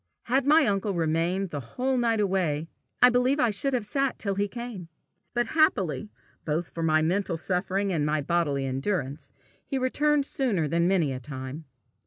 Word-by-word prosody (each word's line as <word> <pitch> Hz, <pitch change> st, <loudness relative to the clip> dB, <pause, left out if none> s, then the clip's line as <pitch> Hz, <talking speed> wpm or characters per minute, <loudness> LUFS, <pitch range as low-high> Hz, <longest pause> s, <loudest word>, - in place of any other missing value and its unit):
Had 265 Hz, +3 st, +1 dB
my 305 Hz, +1 st, +6 dB
uncle 200 Hz, -2 st, 0 dB
remained 170 Hz, +3 st, 0 dB
the 145 Hz, -, -3 dB
whole 255 Hz, -, -2 dB
night 230 Hz, -3 st, +1 dB
away, 180 Hz, -6 st, 0 dB, 0.4 s
I 250 Hz, -, +9 dB
believe 250 Hz, +4 st, +2 dB
I 240 Hz, -, +3 dB
should 270 Hz, +7 st, 0 dB
have 245 Hz, -4 st, 0 dB
sat 275 Hz, +3 st, -1 dB
till 200 Hz, -2 st, -1 dB
he 200 Hz, +1 st, 0 dB
came. 235 Hz, -6 st, -7 dB, 0.5 s
But, 240 Hz, 0 st, +2 dB
happily 215 Hz, -, +1 dB, 0.3 s
both 160 Hz, +3 st, -2 dB
for 165 Hz, -, -6 dB
my 155 Hz, -1 st, +3 dB
mental 180 Hz, +1 st, 0 dB
suffering 190 Hz, +3 st, -1 dB
and 155 Hz, -3 st, 0 dB
my 150 Hz, 0 st, +1 dB
bodily 145 Hz, -4 st, 0 dB
endurance, 140 Hz, +1 st, -3 dB, 0.3 s
he 270 Hz, -, -3 dB
returned 285 Hz, +3 st, +2 dB
sooner 220 Hz, -, 0 dB
than 170 Hz, +3 st, +1 dB
many 170 Hz, -8 st, +2 dB
a 130 Hz, -, -5 dB
time. 130 Hz, +4 st, -7 dB
190 Hz, 175 wpm, -27 LUFS, 155-240 Hz, 0.5 s, I